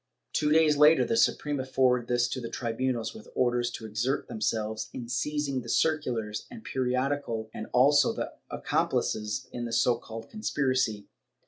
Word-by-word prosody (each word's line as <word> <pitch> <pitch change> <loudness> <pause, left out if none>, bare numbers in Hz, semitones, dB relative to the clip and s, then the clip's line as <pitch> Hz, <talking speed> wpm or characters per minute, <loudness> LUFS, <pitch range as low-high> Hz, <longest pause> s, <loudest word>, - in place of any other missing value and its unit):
Two 150 0 +1
days 155 -1 +5
later 150 +2 +6
the - - -1
Supre 150 -9 +2
ma 130 - -2
forwarded 130 -2 +2
this 120 0 +2
to 130 - -3
the 115 - -5
tribunals, 120 0 -2
with 220 0 -12
orders 120 -1 +2
to 110 - -7
exert 115 +5 -1
themselves 110 -1 -2
in 120 -2 -6
seizing 140 +1 -1
the - - -10
circulars 125 -9 0
and 235 -2 -10
periodical 125 - -1
and 110 - -6
also 140 +4 +5
the - - -4 0.2
accomplices 105 +4 -1
in 120 -1 -4
the 115 - -5
so 120 0 +2
called 115 -1 -8
conspiracy. 130 - -1
125 Hz, 160 wpm, -28 LUFS, 115-145 Hz, 0.2 s, later